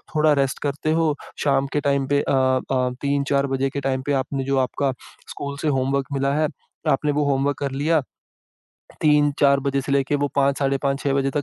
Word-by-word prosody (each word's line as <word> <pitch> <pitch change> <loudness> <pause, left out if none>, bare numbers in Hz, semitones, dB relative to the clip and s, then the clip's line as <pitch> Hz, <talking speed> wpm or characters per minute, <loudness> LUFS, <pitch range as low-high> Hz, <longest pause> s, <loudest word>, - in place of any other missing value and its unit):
थोड़ा 155 0 +4
रेस्ट 135 - -3
करते 145 +2 -1
हो, 160 -2 +2 0.3
शाम 140 -1 +2
के 145 - +1
टाइम 140 -1 +1
पे 140 - +3
अ - - -2
अ, 130 -1 +1
3-4 140 0 +1
बजे 135 0 0
के 140 +1 -4
टाइम 130 -1 -1
पे 145 - +1
आपने 135 0 -4
जो 135 0 0
आपका 140 0 -1 0.4
स्कूल 140 0 -6
से 155 - -1
होमवर्क 135 0 +1
मिला 135 0 0
है, 155 0 +2 0.4
आपने 145 +2 +2
वो 150 +1 +1
होमवर्क 140 +1 0
कर 140 -1 -2
लिया, 150 +4 +1 1.0
3-4 145 -2 +3
बजे 140 0 0
से 140 - -3
लेके 140 +1 +2
वो 145 - 0
5 140 0 +2
साढ़े 140 -1 +1
5, 140 0 0
6 140 - 0
बजे 135 0 +1
तक 145 +1 -1
140 Hz, 205 wpm, -22 LUFS, 135-145 Hz, 1.0 s, थोड़ा